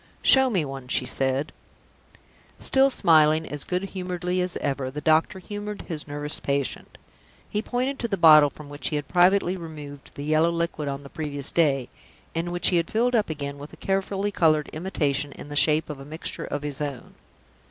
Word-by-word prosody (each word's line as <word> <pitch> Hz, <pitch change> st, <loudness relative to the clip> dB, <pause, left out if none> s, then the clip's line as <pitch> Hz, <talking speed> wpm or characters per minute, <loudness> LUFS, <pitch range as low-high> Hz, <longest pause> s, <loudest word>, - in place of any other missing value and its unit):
"Show 265 Hz, -1 st, +6 dB
me 185 Hz, -10 st, 0 dB
one," 135 Hz, -2 st, -7 dB
she 125 Hz, -, 0 dB
said, 135 Hz, +3 st, 0 dB, 1.1 s
Still 270 Hz, +1 st, +4 dB
smiling 160 Hz, -, +4 dB
as 145 Hz, -2 st, -5 dB
good 180 Hz, +1 st, -2 dB
humoredly 180 Hz, -1 st, -2 dB
as 180 Hz, 0 st, 0 dB
ever, 135 Hz, -2 st, -2 dB
the 145 Hz, +3 st, -6 dB
doctor 160 Hz, +4 st, +2 dB
humored 205 Hz, +2 st, -6 dB
his 155 Hz, -4 st, -6 dB
nervous 145 Hz, +1 st, -5 dB
patient. 140 Hz, -1 st, -3 dB, 0.5 s
He 210 Hz, -, -2 dB
pointed 255 Hz, +4 st, -2 dB
to 235 Hz, -, -1 dB
the 195 Hz, -, -2 dB
bottle 155 Hz, -3 st, +8 dB
from 150 Hz, +1 st, -12 dB
which 145 Hz, 0 st, -3 dB
he 155 Hz, -, -2 dB
had 145 Hz, -1 st, -3 dB
privately 180 Hz, +1 st, +3 dB
removed 150 Hz, -5 st, -9 dB
the 140 Hz, -, -6 dB
yellow 155 Hz, +2 st, +3 dB
liquid 170 Hz, -3 st, -2 dB
on 140 Hz, 0 st, -4 dB
the 140 Hz, -, -11 dB
previous 145 Hz, -3 st, -2 dB
day, 140 Hz, -6 st, +2 dB, 0.5 s
and 170 Hz, +1 st, -2 dB
which 175 Hz, 0 st, +3 dB
he 180 Hz, -, +2 dB
had 165 Hz, -1 st, 0 dB
filled 240 Hz, +3 st, +1 dB
up 220 Hz, -6 st, +2 dB
again 140 Hz, -2 st, -5 dB
with 145 Hz, +2 st, -10 dB
a -, -, -12 dB
carefully 195 Hz, +1 st, -1 dB
colored 155 Hz, -5 st, +2 dB
imitation 145 Hz, -4 st, -2 dB
in 145 Hz, -, -10 dB
the 145 Hz, -, -6 dB
shape 155 Hz, +2 st, +3 dB
of 150 Hz, -3 st, -7 dB
a -, -, -9 dB
mixture 155 Hz, +4 st, -5 dB
of 145 Hz, 0 st, -4 dB
his 145 Hz, -1 st, -4 dB
own. 140 Hz, -4 st, -5 dB
155 Hz, 195 wpm, -25 LUFS, 145-180 Hz, 1.1 s, bottle